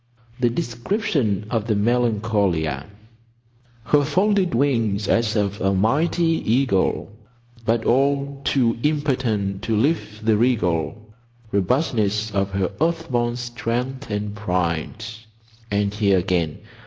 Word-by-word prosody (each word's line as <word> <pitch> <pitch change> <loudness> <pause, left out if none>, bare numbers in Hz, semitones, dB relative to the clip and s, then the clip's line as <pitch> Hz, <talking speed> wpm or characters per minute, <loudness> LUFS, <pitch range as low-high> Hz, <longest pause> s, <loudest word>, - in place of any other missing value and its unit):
"The 120 -1 +3
description 120 - -1
of 115 -3 -1
the 110 - +2
Melancolia— 105 - +1 1.0
"Her 145 +3 +3
folded 185 - +2
wings 115 -7 +1
as 115 -1 +2
of 105 -1 -1
a 95 0 +2
mighty 160 - +2
eagle, 125 -9 +1 0.6
But 115 0 +1
all 140 +2 +1
too 120 -5 +1
impotent 125 -10 0
to 110 - -1
lift 110 -5 -1
the 110 -2 +4
regal 105 -6 +1 0.5
Robustness 105 - +1
of 100 -1 0
her 95 -2 0
earth 165 -1 0
born 120 -1 +1
strength 120 +2 -3
and 105 -1 -3
pride. 90 0 -2 0.6
And 100 0 0
here 100 -2 +3
again. 85 -4 0
115 Hz, 115 wpm, -22 LUFS, 100-135 Hz, 1.0 s, the